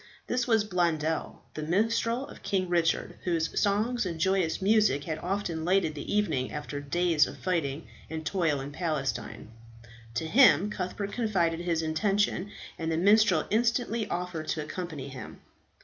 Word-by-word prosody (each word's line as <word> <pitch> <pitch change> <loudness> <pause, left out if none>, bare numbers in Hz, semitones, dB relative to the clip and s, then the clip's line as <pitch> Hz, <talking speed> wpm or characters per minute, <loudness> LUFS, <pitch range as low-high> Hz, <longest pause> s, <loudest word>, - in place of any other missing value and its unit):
This 250 0 -1
was 220 -3 +3
Blondel, 165 -5 -1
the 155 - -5
minstrel 225 - +1
of - - -13
King 190 -2 0
Richard, 170 -2 0
whose 165 -2 0
songs 215 +5 +1
and 170 -4 -4
joyous 190 -1 +1
music 200 -8 +3
had 155 +1 -4
often 175 -3 -2
lightened 180 -2 +2
the 145 - -6
evening 160 -12 0
after 150 -1 -5
days 160 +2 +2
of - - -9
fighting 165 -5 -2 0.2
and 160 0 -5
toil 160 -4 +1
in 140 +2 -6
Palestine. 135 -10 -3 0.7
To 140 - -1
him 205 - +5
Cuthbert 200 +1 -4
confided 185 -9 0
his 170 -2 -1
intention, 195 +4 0 0.3
and 165 0 -2
the 160 - 0
minstrel 200 -2 +4
instantly 230 -1 +1
offered 175 -3 -3
to 155 - -1
accompany 155 -4 -6
him. 130 -1 -9
175 Hz, 150 wpm, -28 LUFS, 155-205 Hz, 0.7 s, him